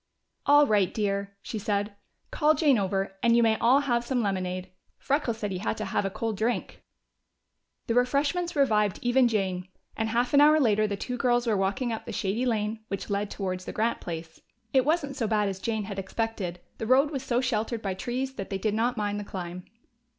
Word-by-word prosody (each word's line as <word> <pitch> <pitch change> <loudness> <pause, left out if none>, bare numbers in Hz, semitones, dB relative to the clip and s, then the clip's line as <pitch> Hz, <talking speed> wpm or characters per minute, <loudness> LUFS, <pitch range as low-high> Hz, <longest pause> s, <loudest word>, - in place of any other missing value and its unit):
"All 290 +1 +7
right, 205 -7 +2
dear," 200 -1 -2
she 220 - -4
said. 205 0 -1 0.4
"Call 305 0 +3
Jane 285 -8 +4
over, 195 0 -1
and 235 0 +4
you 235 - +5
may 220 -1 +4
all 255 +5 +5
have 240 -4 0
some 245 -1 0
lemonade. 185 -2 -2 0.3
Freckles 270 -5 0
said 210 -2 -3
he 185 - -3
had 220 - -2
to 215 - -3
have 195 +1 -1
a - - 0
cold 215 +1 -3
drink." 230 +4 -2 1.0
The 230 - 0
refreshments 285 +8 +1
revived 215 -8 +2
even 245 +1 +4
Jane, 190 -5 -1 0.3
and 220 0 -1
half 240 +3 0
an 285 - +7
hour 305 +1 +6
later 215 -5 +3
the 200 -1 -3
two 250 +4 -4
girls 240 -1 +2
were 225 -3 +2
walking 200 +6 0
up 220 - -6
the - - -4
shady 220 +6 -1
lane 215 -1 -1
which 200 0 -5
led 200 0 -1
towards 185 -2 -4
the - - -6
Grant 225 +2 0
place. 165 -1 -7 0.3
It 260 -1 +4
wasn't 300 -3 0
so 235 -5 -1
bad 210 -1 +1
as 195 -1 -4
Jane 220 0 -2
had 195 -1 -5
expected; 195 -3 -3 0.2
the 220 - -3
road 270 +4 +4
was 270 -4 -3
so 245 -2 0
sheltered 230 -2 -1
by 195 -2 -1
trees 255 +7 -3
that 195 - -5
they 195 - -2
did 210 +2 -1
not 235 +3 0
mind 205 -1 -1
the - - -4
climb. 180 -2 -6
220 Hz, 210 wpm, -27 LUFS, 200-250 Hz, 1.0 s, All